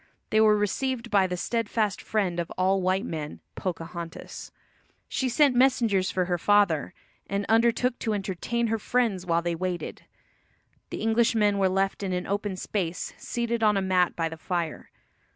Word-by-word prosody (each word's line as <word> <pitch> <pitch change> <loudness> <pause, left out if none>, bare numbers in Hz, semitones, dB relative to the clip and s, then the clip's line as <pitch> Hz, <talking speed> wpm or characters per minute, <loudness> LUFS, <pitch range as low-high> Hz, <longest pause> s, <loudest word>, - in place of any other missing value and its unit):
They 215 - +4
were 215 -1 +5
received 235 +3 -1
by 195 -3 +4
the 180 0 -3
steadfast 220 -1 -1
friend 190 -5 -1
of 170 - -2
all 190 +1 +2
white 185 +4 +1
men, 155 -7 -5
Pocahontas. 170 -1 -6 0.6
She 260 - -1
sent 270 +1 +4
messengers 235 -7 +3
for 185 -1 0
her 175 -1 -1
father, 195 -5 +2 0.3
and 200 +1 -2
undertook 235 +2 +2
to 220 -2 -1
entertain 205 +4 -2
her 225 0 0
friends 210 -6 0
while 170 0 +2
they 170 0 0
waited. 180 +1 -4 0.8
The - - -5
Englishmen 220 -2 +3
were 190 -1 +3
left 195 +2 0
in 190 -2 -2
an 180 0 -2
open 200 0 -2
space, 180 -2 -3
seated 235 -1 -2
on 210 -2 +4
a - - +1
mat 185 -2 +2
by 165 -1 0
the 160 0 -7
fire. 170 -1 -3
195 Hz, 165 wpm, -27 LUFS, 180-225 Hz, 0.8 s, were